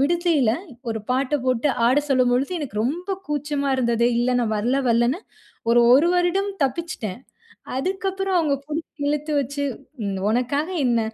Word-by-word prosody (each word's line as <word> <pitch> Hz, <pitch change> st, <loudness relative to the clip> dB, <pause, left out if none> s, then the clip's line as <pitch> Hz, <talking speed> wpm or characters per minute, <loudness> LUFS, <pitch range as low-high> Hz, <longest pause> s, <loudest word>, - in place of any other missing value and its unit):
விடுதில 320 Hz, -4 st, +2 dB, 0.4 s
ஒரு 225 Hz, -1 st, -2 dB
பாட்ட 265 Hz, +3 st, +1 dB
போட்டு 255 Hz, +2 st, +1 dB, 0.2 s
ஆட 250 Hz, +3 st, +4 dB
சொல்லும் 255 Hz, -2 st, +3 dB
பொழுது, 260 Hz, +5 st, +1 dB
எனக்கு 280 Hz, -9 st, -6 dB
ரொம்ப 340 Hz, +9 st, -3 dB, 0.2 s
கூச்சமா 290 Hz, -1 st, -1 dB
இருந்தது. 235 Hz, -2 st, +2 dB
இல்ல, 240 Hz, +1 st, +2 dB
நான் 225 Hz, -2 st, 0 dB
வரல, 240 Hz, +6 st, +1 dB
வரலன்னு. 240 Hz, +6 st, +2 dB, 0.5 s
ஒரு, 240 Hz, 0 st, +6 dB
1 300 Hz, +6 st, +4 dB
வருடம் 360 Hz, +3 st, +1 dB
தப்பிச்சுட்டேன். 265 Hz, -, -3 dB, 0.6 s
அதுக்கப்பறம் 385 Hz, +4 st, -1 dB
அவங்க, 305 Hz, -4 st, +2 dB
புடிச்சு 310 Hz, 0 st, -6 dB
இழுத்து 300 Hz, +1 st, -1 dB
வச்சு, 280 Hz, +2 st, -3 dB, 0.7 s
உனக்காக 265 Hz, +7 st, 0 dB, 0.2 s
என்ன? 235 Hz, -2 st, +2 dB
280 Hz, 140 wpm, -23 LUFS, 245-320 Hz, 0.7 s, ஒரு